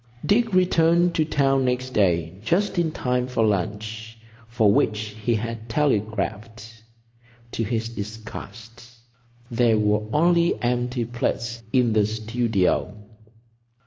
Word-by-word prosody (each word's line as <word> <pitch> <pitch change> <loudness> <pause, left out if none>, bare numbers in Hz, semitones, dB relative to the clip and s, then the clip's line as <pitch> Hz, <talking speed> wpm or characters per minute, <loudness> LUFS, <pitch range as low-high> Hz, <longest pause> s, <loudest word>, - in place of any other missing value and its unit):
Dick 225 +2 +2
returned 175 -1 +3
to 155 - +2
town 135 -3 +2
next 125 0 -1
day 85 -7 +1
just 175 - 0
in 165 -2 +1
time 125 -3 -1
for 125 -3 +1
lunch, 110 +2 -3 0.3
for 110 -3 +3
which 105 0 0
he 115 +1 +2
had 115 +1 -5
telegraphed. 110 -2 -2 0.7
To 115 - -2
his 115 +1 -2
disgust, 110 +1 -9 0.7
there 115 -1 +3
were 105 0 +1
only 170 +3 +3
empty 125 0 -1
plates 120 0 -3
in 125 -4 +2
the 105 -1 +3
studio. 110 -2 0
115 Hz, 115 wpm, -23 LUFS, 110-130 Hz, 0.7 s, returned